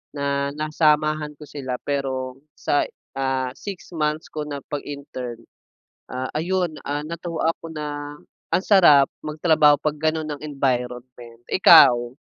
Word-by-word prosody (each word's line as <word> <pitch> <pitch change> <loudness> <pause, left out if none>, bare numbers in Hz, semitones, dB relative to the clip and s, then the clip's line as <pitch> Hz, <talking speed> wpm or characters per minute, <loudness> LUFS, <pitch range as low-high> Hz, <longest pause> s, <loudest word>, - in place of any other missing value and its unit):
na 140 0 -1
nasamahan 155 -1 +1
ko 150 - -11
sila 130 -4 -5
pero, 130 -2 -2 0.2
sa, 145 - +1 0.4
ah, 130 -1 -1
6 195 +1 -9
months 155 0 -1
ko 155 - -4
na 145 -1 -4
pag-intern, 140 -4 -6 0.7
ah, 130 +1 -3
ayun, 175 +1 -1
ah, 145 +1 -2
natuwa 165 -1 -2
ako 165 - -11
na, 145 -1 -6 0.3
ang 185 - +2
sarap, 150 -9 +6 0.2
magtrabaho 155 -1 +4
'pag 155 -1 -1
gano'n 155 0 -1
ang 145 0 -6
environment. 125 -4 -3
Ikaw? 120 -9 +6
145 Hz, 125 wpm, -23 LUFS, 135-155 Hz, 0.7 s, sarap